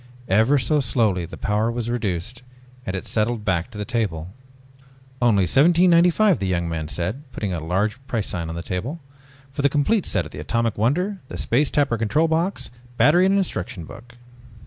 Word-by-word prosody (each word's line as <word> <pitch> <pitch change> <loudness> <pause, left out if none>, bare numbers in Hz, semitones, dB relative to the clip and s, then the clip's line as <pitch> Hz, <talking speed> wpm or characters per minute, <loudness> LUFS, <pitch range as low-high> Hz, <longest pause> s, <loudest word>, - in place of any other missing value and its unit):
Ever 110 +9 +4
so 150 +3 +1
slowly 110 -8 +1
the - - -10
power 110 +2 0
was 120 -1 -3
reduced 115 0 -3 0.5
and 95 - -2
it 95 - -5
settled 110 0 -1
back 90 0 0
to 110 - -11
the 105 - -3
table. 95 -7 -2 0.9
"Only 105 -6 +4
$17.95," 175 - +4
the 95 - -2
young 85 -2 0
man 80 -2 -3
said, 95 - -3
putting 100 -4 -3
a 80 -3 -4
large 105 +9 -1
price 115 -6 -2
sign 85 -4 -3
on 80 - -5
the 85 - -5
table. 115 - -4 0.5
"For 140 - -3
the 140 - +4
complete 155 +9 +1
set 90 -5 0
of 75 - -10
the - - -8
Atomic 115 +8 -1
Wonder, 180 - 0
the - - -7
Space 140 +5 +2
Tapper 140 -6 +1
control 150 +9 +2
box, 165 +5 -1 0.3
battery 175 +6 +5
and 195 +1 +3
instruction 90 - -3
book 120 +7 -13
115 Hz, 185 wpm, -22 LUFS, 95-145 Hz, 0.9 s, battery